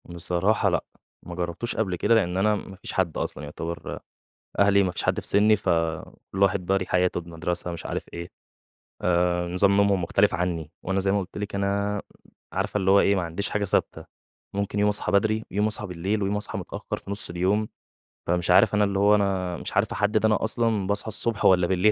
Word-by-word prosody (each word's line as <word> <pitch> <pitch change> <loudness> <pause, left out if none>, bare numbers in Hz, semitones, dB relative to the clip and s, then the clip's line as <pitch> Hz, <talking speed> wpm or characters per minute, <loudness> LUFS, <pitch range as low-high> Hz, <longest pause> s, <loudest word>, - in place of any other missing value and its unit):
بصراحة 90 +4 +1
لأ، - - 0 0.4
ما 85 - -8
جرّبتوش 90 +7 -3
قبل 95 -5 -1
كده 115 - +2
لإن 90 -4 +1
أنا 105 +2 +3
ما 95 -1 -8
فيش 100 - -9
حد 90 -4 0
أصلًا - - -4
يُعتبر 80 +3 -6 0.6
أهلي 100 0 +5
ما 95 - 0
فيش - - -3
حد - - +1
في - - -3
سِنّي 105 +2 +5
فكلّ 85 +1 -2
واحد 100 -2 +2
بقى 95 +1 +2
ليه 95 - -4
حياته 90 -1 +1
بمدرسة 85 +1 -3
مش 85 -1 -6
عارف - - -4
إيه 85 0 -6 0.7
آآ، 90 0 +1
نظام 95 +3 +3
نومهم 100 -2 +3
مختلِف 100 +4 +2
عني 85 -3 -2
وأنا 95 +1 -1
زي 95 0 +1
ما 100 - +2
قُلت 95 +1 -8
لِك 105 -1 -5
أنا، 100 +1 -1 0.5
عارفة - - -1
اللي 95 -1 +1
هو 100 +1 +6
إيه 100 0 +3
ما 95 - 0
عنديش 85 +4 -3
حاجة 105 -1 -1
ثابتة، 100 - 0 0.5
ممكن 100 0 -2
يوم 105 0 +3
أصحى 105 - -1
بدري، 110 +2 +2
يوم 105 +2 +1
أصحى 105 0 -2
بالليل 95 +4 -2
ويوم 100 +1 0
أصحى 105 - -3
متأخّر - - -5
في - - -11
نُص 100 -3 -1
اليوم، 95 +5 0 0.6
فمش 90 0 0
عارف 100 +3 +5
أنا 105 - +3
اللي 100 -1 0
هو 105 +1 +5
أنا 95 -3 -1
مش - - -7
عارف - - +1
أحدِّد 105 +1 +1
أنا 110 -1 +2
أصلًا 110 -3 +1
باصحى 100 +2 0
الصبح 110 0 -1
والَّا 90 -2 +5
بالليل 95 +3 +3
95 Hz, 205 wpm, -25 LUFS, 90-105 Hz, 0.7 s, هو